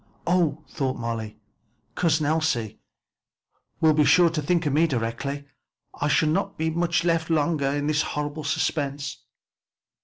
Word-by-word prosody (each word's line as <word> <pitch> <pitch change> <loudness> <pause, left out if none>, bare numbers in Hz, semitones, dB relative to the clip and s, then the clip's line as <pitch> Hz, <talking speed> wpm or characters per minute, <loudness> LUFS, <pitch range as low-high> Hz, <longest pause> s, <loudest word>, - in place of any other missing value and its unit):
"Oh!" 170 -4 +1
thought 130 -3 -2
Molly, 115 -2 -4 0.6
"Cousin 160 -3 +1
Elsie 150 -8 0 1.0
will 160 -1 +5
be 150 0 +4
sure 170 +4 +5
to 160 -2 -2
think 170 +3 +1
of 145 - 0
me 160 +3 +4
directly 120 +1 -2
and 140 - -16 0.5
I 145 - -2
shall 155 +1 +3
not 155 - -1
be 160 0 0
left 170 +1 0
much 165 -1 +1
longer 155 -2 +1
in 145 +1 -1
this 155 0 +2
horrible 150 +1 -3
suspense." 140 -1 -2
150 Hz, 150 wpm, -25 LUFS, 140-160 Hz, 1.0 s, will